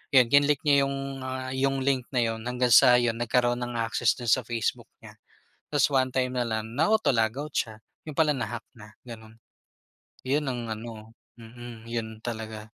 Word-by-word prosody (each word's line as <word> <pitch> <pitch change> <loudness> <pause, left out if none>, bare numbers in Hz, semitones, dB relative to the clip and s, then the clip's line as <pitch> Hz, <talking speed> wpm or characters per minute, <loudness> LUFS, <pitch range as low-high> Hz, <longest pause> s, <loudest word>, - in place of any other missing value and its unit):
Yun, 125 -2 +7
kinlick 145 0 +4
niya 140 -1 +5
yung, 140 0 -3 0.3
ah, 130 0 -4
yung 135 0 +1
link 130 -3 0
na 125 -3 +2
yun 115 0 -4
hanggang 125 0 0
sa 125 +1 +8
yun, 120 -1 0
nagkaroon 120 +1 +1
ng 120 0 -5
access 115 0 +1
do'n 120 - -6
sa 130 - +3
Facebook 115 -1 -2
niya. - - -13 0.5
Tas 145 -1 +1
one 130 -1 +3
time 130 -1 0
na 120 - +1
lang 110 0 -3
na-auto 165 - +2
log-out 125 +6 -1
siya, 110 -1 -2 0.3
yun 150 - -6
pala 160 -2 +3
na-hack 120 -3 -4
na, 105 -2 -14 0.2
gano'n. 110 -2 -11 0.9
Yun 145 +3 0
ang 120 -2 -3
ano 110 0 -10 0.2
mm, 115 0 -11
yun 110 -2 -4
talaga. 110 -2 -5
120 Hz, 180 wpm, -27 LUFS, 115-130 Hz, 0.9 s, sa